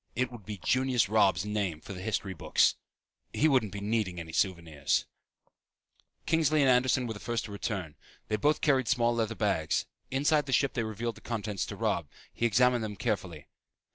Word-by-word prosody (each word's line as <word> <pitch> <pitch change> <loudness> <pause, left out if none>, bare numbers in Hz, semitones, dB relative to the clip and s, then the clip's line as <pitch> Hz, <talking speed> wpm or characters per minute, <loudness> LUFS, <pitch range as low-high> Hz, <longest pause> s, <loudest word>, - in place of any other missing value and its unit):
It 130 0 0
would 115 -5 -11
be 105 -1 -5
Junius 125 +1 +1
Robb's 100 -4 +3
name 100 -6 -2
for 95 - -9
the 90 - -7
history 100 -1 -2
books. 85 - +3 0.6
He 155 - +3
wouldn't 125 -9 +2
be 100 +1 -6
needing 105 -4 -1
any 80 -1 -8
souvenirs. 85 -7 0 1.2
Kingsley 155 -2 +3
and 135 -2 +5
Anderson 125 0 +3
were 115 - -3
the 105 - -9
first 120 0 -2
to 105 - -9
return. 95 -6 -4 0.3
They 105 - 0
both 150 +8 +2
carried 135 -5 +2
small 120 -3 +2
leather 115 -1 -1
bags. 95 -9 0 0.2
Inside 145 +2 +2
the 135 - -2
ship 140 0 +2
they 120 - -1
revealed 110 +1 -3
the - - -14
contents 105 -5 -3
to - - -6
Robb. - - -1 0.3
He 120 - +1
examined 125 +1 +3
them 105 -1 -4
carefully. 95 - -3
110 Hz, 185 wpm, -30 LUFS, 95-125 Hz, 1.2 s, and